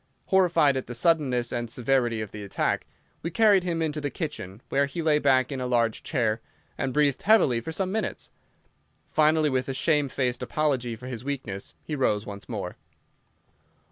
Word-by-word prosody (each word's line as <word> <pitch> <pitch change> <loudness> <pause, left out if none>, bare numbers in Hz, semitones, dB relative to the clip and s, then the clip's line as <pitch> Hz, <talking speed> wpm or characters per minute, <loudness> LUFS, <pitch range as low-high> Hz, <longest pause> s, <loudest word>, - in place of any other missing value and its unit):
Horrified 175 -7 +4
at 130 - -4
the 120 - -5
suddenness 130 -5 +2
and 120 -1 -3
severity 120 -2 +1
of 110 - -6
the 105 - -7
attack, 100 - -1 0.3
we 165 - -3
carried 205 +1 +5
him 170 -2 -1
into 150 -1 -2
the 145 - -1
kitchen, 115 - -6
where 140 +1 +2
he 155 +5 -6
lay 155 -2 +3
back 130 -2 +3
in 135 -2 -3
a 125 - -2
large 115 -3 +1
chair, 115 -6 0 0.3
and 135 - -2
breathed 145 -1 +2
heavily 185 - +4
for 160 - -5
some 185 +3 -1
minutes. 220 +2 -3 0.8
Finally, 155 -1 +3
with 130 0 -1
a 135 - -2
shamefaced 135 -5 +1
apology 125 -2 0
for 120 +3 -12
his 125 -3 -6
weakness, 125 -9 -5
he 155 - -4
rose 110 -6 +1
once 100 -1 -9
more. - - -5
135 Hz, 175 wpm, -26 LUFS, 120-155 Hz, 0.8 s, carried